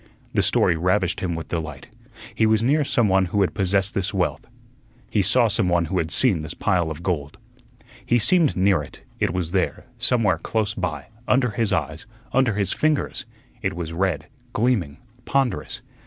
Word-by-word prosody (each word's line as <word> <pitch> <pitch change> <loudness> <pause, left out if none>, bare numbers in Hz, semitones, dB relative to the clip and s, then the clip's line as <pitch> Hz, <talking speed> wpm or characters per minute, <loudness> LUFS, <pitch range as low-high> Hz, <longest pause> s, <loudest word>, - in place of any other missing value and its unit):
The - - +3
story 85 - +3
ravished 90 +1 +1
him 85 -3 -2
with 80 - -6
delight. 75 -4 -5 0.5
He 110 - +2
was 110 0 +2
near 145 +5 +3
someone 100 -8 +2
who 100 +3 0
had 95 - +1
possessed 95 0 0
this 100 +1 -1
wealth. 90 -2 -1 0.6
He 105 - +2
saw 115 +5 +4
someone 90 -5 +1
who 90 +3 -1
had 80 - -1
seen 95 - +3
this 75 -1 -7
pile 85 -3 +1
of 80 +2 -7
gold. 75 -6 -2 0.7
He 120 - +2
seemed 160 - +3
near 95 -3 +3
it; 70 - -12 0.2
it - - +1
was 85 -2 -2
there, 95 -1 -1
somewhere 105 -9 +2
close 105 +3 -1
by, 80 -6 -4 0.2
under 125 -2 +2
his 105 0 0
eyes, - - -2 0.3
under 130 -5 +2
his 100 -3 0
fingers; 155 -1 -1 0.3
it - - -2
was 85 -2 -5
red, 85 -4 -1 0.3
gleaming, 105 - 0 0.3
ponderous. 135 -3 -1
95 Hz, 170 wpm, -23 LUFS, 85-110 Hz, 0.7 s, saw